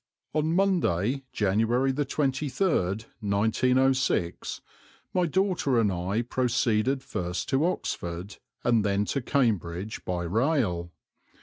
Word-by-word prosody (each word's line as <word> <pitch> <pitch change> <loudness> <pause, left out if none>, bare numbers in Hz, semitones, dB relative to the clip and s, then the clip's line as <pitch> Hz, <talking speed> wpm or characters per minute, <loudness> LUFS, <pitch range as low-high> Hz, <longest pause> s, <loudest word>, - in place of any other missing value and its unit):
On 155 +2 +1
Monday, 140 - +1
January 115 +6 +2
the 140 +1 -1
23rd, 135 - 0
1906, 120 0 +1 0.5
my 180 -2 +2
daughter 175 -8 +1
and 105 -3 +2
I 95 +6 -1
proceeded 125 +1 +1
first 90 -5 -3
to 135 +3 +2
Oxford, 90 - -4 0.3
and 115 -3 +3
then 100 0 +1
to 140 - -1
Cambridge 105 - -1
by 90 -1 -2
rail. 100 - 0
120 Hz, 105 wpm, -27 LUFS, 100-135 Hz, 0.5 s, and